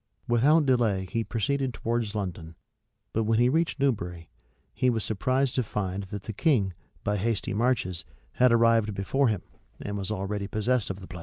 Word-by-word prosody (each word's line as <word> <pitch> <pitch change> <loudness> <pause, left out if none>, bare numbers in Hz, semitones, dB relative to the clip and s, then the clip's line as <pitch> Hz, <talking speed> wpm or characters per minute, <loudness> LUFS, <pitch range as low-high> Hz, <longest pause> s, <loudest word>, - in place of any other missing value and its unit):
[] - - -41
Without 145 +7 +4
delay 115 -8 +2
he 115 +5 -2
proceeded 130 +3 -1
towards 115 -2 -2
London; 85 -5 -4 0.6
but 110 0 +1
when 110 +1 +2
he 120 +1 +4
reached 160 +1 +1
Newbury, 90 -11 -1 0.4
he 130 - +2
was 115 -3 0
surprised 130 +5 +1
to 130 - +1
find 100 -3 -3
that 100 +1 -7
the 110 - -5
king, 105 - +2 0.3
by 105 0 0
hasty 105 -1 -1
marches, 105 -6 0 0.3
had 125 - +4
arrived 115 -3 +4
before 135 +8 +1
him, 105 -6 -1 0.4
and 100 0 -4
was 95 0 -4
already 100 -1 -2
possessed 110 +2 0
of 95 +1 -5
the 95 - -10
place. 90 - -8
110 Hz, 180 wpm, -27 LUFS, 100-125 Hz, 0.6 s, Without